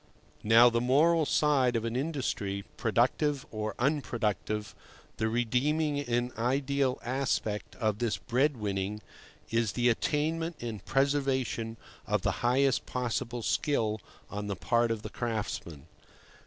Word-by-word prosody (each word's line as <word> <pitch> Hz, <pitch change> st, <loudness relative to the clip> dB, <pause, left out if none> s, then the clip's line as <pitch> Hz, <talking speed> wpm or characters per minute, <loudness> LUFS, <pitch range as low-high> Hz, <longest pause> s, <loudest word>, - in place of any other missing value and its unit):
Now, 115 Hz, +3 st, +7 dB
the 115 Hz, 0 st, +1 dB
moral 155 Hz, +5 st, +4 dB
side 135 Hz, -5 st, +3 dB
of 115 Hz, 0 st, 0 dB
an 115 Hz, +1 st, -2 dB
industry, 125 Hz, -9 st, -2 dB
productive 130 Hz, +5 st, +1 dB
or 110 Hz, 0 st, -3 dB
unproductive, 110 Hz, -, -1 dB, 0.4 s
the 110 Hz, 0 st, 0 dB
redeeming 140 Hz, +6 st, +1 dB
and 120 Hz, -2 st, -1 dB
ideal 135 Hz, +2 st, +1 dB
aspect 125 Hz, -4 st, -1 dB
of 110 Hz, -3 st, -1 dB
this 115 Hz, -5 st, 0 dB
bread 135 Hz, +6 st, +1 dB
winning, 105 Hz, 0 st, -3 dB, 0.5 s
is 115 Hz, -2 st, +1 dB
the 120 Hz, 0 st, +3 dB
attainment 160 Hz, +7 st, 0 dB
and 115 Hz, -5 st, -5 dB
preservation 135 Hz, -5 st, 0 dB, 0.3 s
of 105 Hz, -2 st, 0 dB
the 100 Hz, -, +2 dB
highest 130 Hz, +2 st, +2 dB
possible 120 Hz, -1 st, -2 dB
skill 110 Hz, -8 st, 0 dB, 0.3 s
on 105 Hz, 0 st, -5 dB
the 100 Hz, -, -2 dB
part 120 Hz, +5 st, +1 dB
of 110 Hz, -2 st, -2 dB
the -, -, -6 dB
craftsmen. 105 Hz, -, -4 dB
120 Hz, 130 wpm, -30 LUFS, 110-140 Hz, 0.5 s, Now